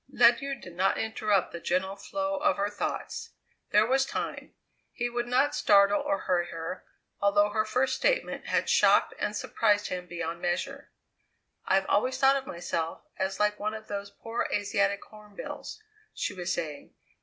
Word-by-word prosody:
Ledyard 245 +2 +4
did 175 -2 -11
not 190 +2 +2
interrupt 215 -3 +1
the 170 - -6
gentle 185 +3 -1
flow 290 +8 -3
of 300 +1 +2
her 200 +1 0
thoughts. 205 - -4 0.4
There 210 +1 +5
was 265 +3 +3
time; - - -5 0.4
he 240 -1 -2
would 240 0 -2
not 255 +4 +3
startle 200 +3 +5
or 295 +1 -1
hurry 175 -2 +1
her, 165 +2 -6 0.4
although 205 +1 +4
her 215 0 +1
first 255 +5 +1
statement - - 0
had - - +1
shocked - - +4
and - - -1
surprised 205 -2 +1
him 180 -1 -4
beyond 170 -1 -4
measure. 275 +11 -2 0.8
"I've 195 0 +3
always 255 +7 +1
thought 270 0 +5
of 270 -1 -3
myself 165 -1 -3 0.2
as 190 0 -1
like 210 0 +2
one 215 +1 -2
of 220 0 -10
those 200 -1 -4
poor 225 +3 -4
Asiatic 200 -1 0
hornbills," 210 - -9 0.4
she 205 - -2
was 180 -2 -3
saying. 155 -4 -4
205 Hz, 165 wpm, -28 LUFS, 190-240 Hz, 0.8 s, There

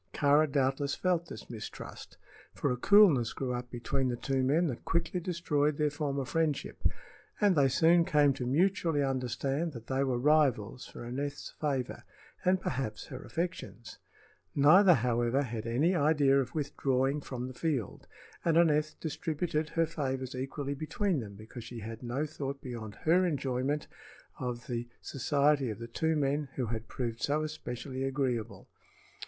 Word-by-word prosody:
Kāra 145 +1 +4
doubtless 140 0 +1
felt 175 -2 0
this 110 - -9
mistrust, 110 -2 -8 0.4
for - - 0
a - - +1
coolness 160 - +5
grew 130 -2 -2
up 125 0 -4
between 130 +2 -1
the 125 - -1
two 135 +2 -1
men 145 +7 +3
that 130 -8 -3
quickly 170 +2 0
destroyed 155 -4 0
their 150 -1 +1
former 140 -2 -2
friendship, 155 +1 -1 0.6
and 205 -3 +4
they 140 -3 +5
soon 165 +5 +5
came 150 -3 +4
to 125 -2 -4
mutually 165 0 +2
understand 135 +4 -1
that 115 -3 -9
they 130 +2 0
were 130 -3 0
rivals 130 -4 +2
for - - -9
Aneth's 140 +4 -4
favor, 135 -5 -3 0.4
and 185 +1 +3
perhaps 125 - -3
her 130 - -7
affections. 165 -9 -5 0.6
Neither, 175 +6 +7
however, 120 +2 +1
had 115 -3 -5
any 145 +10 +2
idea 145 -4 +4
of 130 - -6
withdrawing 140 -1 0
from 125 -2 -5
the 130 - -7
field, 135 - -2 0.4
and 165 -1 +3
Aneth 155 -2 +3
distributed 155 0 -2
her 165 0 +2
favors 135 -5 -3
equally 135 +2 -3
between 155 +4 -1
them 100 -4 -7
because 110 +3 -10
she 115 0 -8
had 115 +1 -7
no 125 +5 -2
thought 140 -2 -5
beyond 115 -5 -7
her 175 +4 +5
enjoyment 140 -3 -1 0.5
of 125 0 -4
the 120 -3 -3
society 140 0 +1
of 105 - -4
the 115 - -7
two 160 +7 0
men 145 0 0
who 130 - -1
had 110 0 -4
proved 115 -2 -4
so 150 +2 +1
especially 130 -3 -5
agreeable. 130 -5 -2
140 Hz, 160 wpm, -31 LUFS, 125-155 Hz, 0.6 s, Neither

